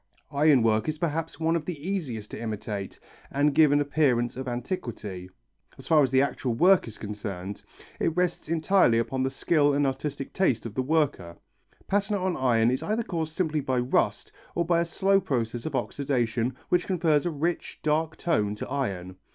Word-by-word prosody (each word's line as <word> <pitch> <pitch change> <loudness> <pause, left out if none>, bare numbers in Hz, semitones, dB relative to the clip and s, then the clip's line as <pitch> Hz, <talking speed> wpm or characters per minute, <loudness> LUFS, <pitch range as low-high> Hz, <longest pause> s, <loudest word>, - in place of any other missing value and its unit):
Iron 145 -3 +4
work 110 +2 +2
is 155 - -3
perhaps 160 -1 -2
one 165 +1 +1
of 160 -2 -2
the 170 -4 -5
easiest 130 - -3
to - - -6
imitate 105 -3 -5 0.3
and 145 +1 +2
give 155 -1 +5
an 145 - +4
appearance 140 -5 +1
of 130 +1 -5
antiquity. 120 - -5 0.5
As 135 - -10
far 155 -2 +5
as 135 - +3
the 130 +1 +4
actual 125 -3 -2
work 180 +6 +5
is 115 - -8
concerned, 100 -2 -6 0.4
it 165 +1 0
rests 180 -3 0
entirely 165 -6 +3
upon 130 +3 -1
the 130 - +1
skill 145 +1 +2
and 145 0 +2
artistic 135 +1 -3
taste 135 - +1
of 115 - -5
the 130 - 0
worker. 135 - 0 0.5
Patina 200 0 +1
on 185 -1 -1
iron 120 -3 +3
is 130 - -1
either 220 +2 -1
caused 160 -6 -3
simply 160 -4 0
by 130 -2 -1
rust 125 +1 0 0.2
or 170 - +1
by 170 0 +2
a 170 - +1
slow 195 +3 +2
process 120 -5 -2
of - - -4
oxidation 125 -3 -1
which 180 0 +2
confers 165 -4 +2
a - - +1
rich, 165 +2 -2
dark 155 +1 0
tone 105 -12 0
to - - -6
iron. 95 -10 -3
140 Hz, 185 wpm, -27 LUFS, 120-165 Hz, 0.5 s, give